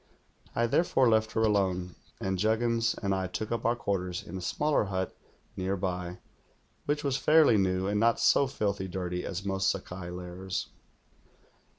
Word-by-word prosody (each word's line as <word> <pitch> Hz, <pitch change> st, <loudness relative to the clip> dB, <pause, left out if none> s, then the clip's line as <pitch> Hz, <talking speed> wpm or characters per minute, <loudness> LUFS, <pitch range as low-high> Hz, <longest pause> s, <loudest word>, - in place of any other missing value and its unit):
I 120 Hz, -, +2 dB
therefore 130 Hz, 0 st, +3 dB
left 110 Hz, -1 st, +2 dB
her 110 Hz, -, +1 dB
alone; 95 Hz, -4 st, +1 dB, 0.3 s
and 95 Hz, -1 st, -2 dB
Juggins 115 Hz, +2 st, +1 dB
and 100 Hz, -1 st, +1 dB
I 95 Hz, -1 st, -1 dB
took 105 Hz, +5 st, -4 dB
up 115 Hz, -2 st, -2 dB
our 120 Hz, +1 st, +3 dB
quarters 95 Hz, -6 st, -2 dB
in 90 Hz, -, -9 dB
a 95 Hz, -, -4 dB
smaller 150 Hz, +6 st, +1 dB
hut 95 Hz, -1 st, -3 dB, 0.4 s
nearby, 90 Hz, -2 st, -2 dB, 0.7 s
which 145 Hz, 0 st, 0 dB
was 140 Hz, -2 st, +1 dB
fairly 155 Hz, -6 st, +5 dB
new 95 Hz, -1 st, +1 dB
and 105 Hz, +1 st, 0 dB
not 115 Hz, +1 st, +3 dB
so 140 Hz, -, +4 dB
filthy 100 Hz, -7 st, -2 dB
dirty 90 Hz, -1 st, -3 dB
as 95 Hz, +1 st, -4 dB
most 95 Hz, 0 st, +1 dB
Sakai 90 Hz, -2 st, -4 dB
lairs. 90 Hz, +1 st, -5 dB
100 Hz, 160 wpm, -29 LUFS, 95-115 Hz, 0.7 s, fairly